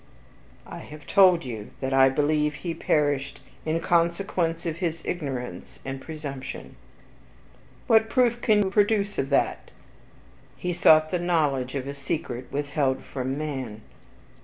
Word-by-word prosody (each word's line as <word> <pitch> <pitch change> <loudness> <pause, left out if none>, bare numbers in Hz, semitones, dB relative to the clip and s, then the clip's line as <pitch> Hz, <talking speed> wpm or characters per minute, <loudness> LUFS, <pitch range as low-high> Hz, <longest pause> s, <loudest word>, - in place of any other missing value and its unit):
"I - - -8
have 150 0 -11
told 185 -5 +5
you 110 -4 -6
that 135 0 -2
I 135 0 +6
believe 150 +2 +1
he 170 +2 -4
perished 145 -3 0 0.3
in 160 +1 +1
consequence 170 0 0
of 165 -1 -2
his 170 -2 -3
ignorance 130 - -5
and 135 0 -5
presumption." 140 -4 -7 1.1
"What 220 -2 +4
proof 240 -2 +2
can 210 -2 +4
you 190 - -2
produce 205 0 +2
of 135 - -1
that?" 140 - 0 0.9
"He 180 0 -2
sought 155 -2 +5
the 180 - 0
knowledge 145 -7 0
of 135 -1 -3
a 140 - -4
secret 140 -3 -4
withheld 140 -2 -1
from 130 +1 -4
man." 130 -8 -4
150 Hz, 135 wpm, -26 LUFS, 135-175 Hz, 1.1 s, I